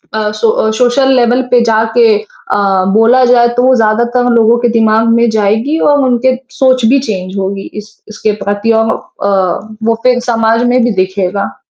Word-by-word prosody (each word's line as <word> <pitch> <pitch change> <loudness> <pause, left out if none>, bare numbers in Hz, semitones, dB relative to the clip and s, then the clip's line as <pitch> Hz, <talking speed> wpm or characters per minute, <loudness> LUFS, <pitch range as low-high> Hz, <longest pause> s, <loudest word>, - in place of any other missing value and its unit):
आ 220 - -1
सो 220 0 -1
social 255 +2 +1
level 245 0 +2
पे 245 -1 +4
जाके 225 +1 +1
अ, 215 -1 -7 0.4
बोला 230 +4 +3
जाए 240 -1 +3
तो 245 - +2
वो 260 0 +3
ज़्यादातर 235 +2 0
लोगों 230 +1 +3
के 240 0 0
दिमाग़ 225 -1 +1
में 235 +1 +2
जाएगी 220 +8 0
और 290 - +2
उनके 255 0 +1 0.2
सोच 255 -3 +2
भी 270 +5 +3
चेंज 190 -7 -5
होगी 195 0 -4 0.2
इस 210 - -19 0.2
इसके 215 0 -3
प्रति 205 +3 -1
और 225 0 0 0.3
अ, - - 0 0.6
वो 230 +1 +1
फिर 250 -1 +2
समाज 225 0 +1
में 255 - +2
भी 240 - 0
दिखेगा। 190 +1 -4
230 Hz, 175 wpm, -11 LUFS, 215-245 Hz, 0.6 s, पे